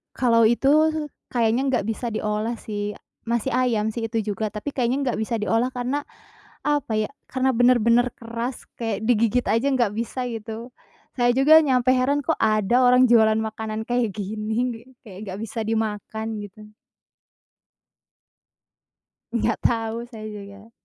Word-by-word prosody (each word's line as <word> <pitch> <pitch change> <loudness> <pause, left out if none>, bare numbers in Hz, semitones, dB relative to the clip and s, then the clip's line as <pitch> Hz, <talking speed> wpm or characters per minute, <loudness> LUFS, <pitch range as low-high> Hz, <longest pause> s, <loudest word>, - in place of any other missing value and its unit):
Kalau 230 -2 +3
itu 235 +4 +3 0.6
kayaknya 235 0 +2
nggak 240 -6 0
bisa 230 +1 -3
diolah 215 +2 -2
sih, 205 -1 -4 0.3
masih 235 +2 -1
ayam 230 -4 +1
sih 225 -1 -3
itu 225 - 0
juga, 215 0 -3
tapi 220 +7 -6
kayaknya 250 0 +1
nggak 240 - -1
bisa 225 0 -2
diolah 225 +4 +1
karena, 255 +4 -2 0.6
apa 290 -5 0
ya 215 0 0 0.2
karena 260 0 +1
bener-bener 245 0 +4
keras 235 +2 -5 0.2
kayak 225 -2 -2
digigit 230 +1 +2
aja 230 +5 +2
nggak 245 -6 +2
bisa 235 +4 -3
gitu, 225 +2 -7 0.5
saya 245 0 +3
juga 305 +4 +7
nyampe 255 -4 +2
heran, 270 +3 +1
kok - - -1
ada 215 +2 +2
orang 250 +1 +6
jualan 220 -2 +5
makanan 220 0 -4
kayak 235 -3 -1
gini, 220 +4 -3 0.2
kayak 195 -6 -11
nggak 190 +1 -6
bisa 225 +1 -5
dimakan 220 0 -2
gitu 210 +1 -11 2.6
Nggak 225 -1 0
tahu, 225 0 0
saya 215 -2 -8
juga. 205 +1 -10
230 Hz, 140 wpm, -23 LUFS, 215-245 Hz, 2.6 s, juga